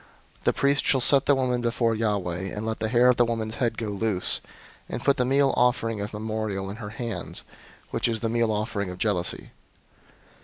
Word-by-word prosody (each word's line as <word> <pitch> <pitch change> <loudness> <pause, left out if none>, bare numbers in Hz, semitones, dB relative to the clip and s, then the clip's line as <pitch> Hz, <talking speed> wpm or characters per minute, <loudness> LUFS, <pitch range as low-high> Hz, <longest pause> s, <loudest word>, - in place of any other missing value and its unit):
005:018 - - -30
The - - +4
priest 140 +1 +2
shall 135 - +3
set 135 +2 +5
the 145 - +5
woman 125 -2 0
before 115 -1 +1
Yahweh, 100 -5 -1
and 105 +3 -5
let 110 0 -2
the 110 - -1
hair 120 +1 +5
of 125 - +4
the 120 - +5
woman's 115 -2 -2
head 115 -3 +1
go 110 -2 -3
loose, 100 -2 0 0.5
and - - -4
put 140 +1 +4
the 125 - +2
meal 135 +1 +3
offering 115 -3 +1
of 105 - -4
memorial 105 -2 -3
in 105 - -8
her 105 -3 -6
hands, 110 -4 -3 0.5
which - - 0
is 115 -2 -1
the 115 - 0
meal 115 0 +1
offering 105 -2 -2
of 90 - -7
jealousy. 90 -4 -1
110 Hz, 205 wpm, -26 LUFS, 105-120 Hz, 0.5 s, set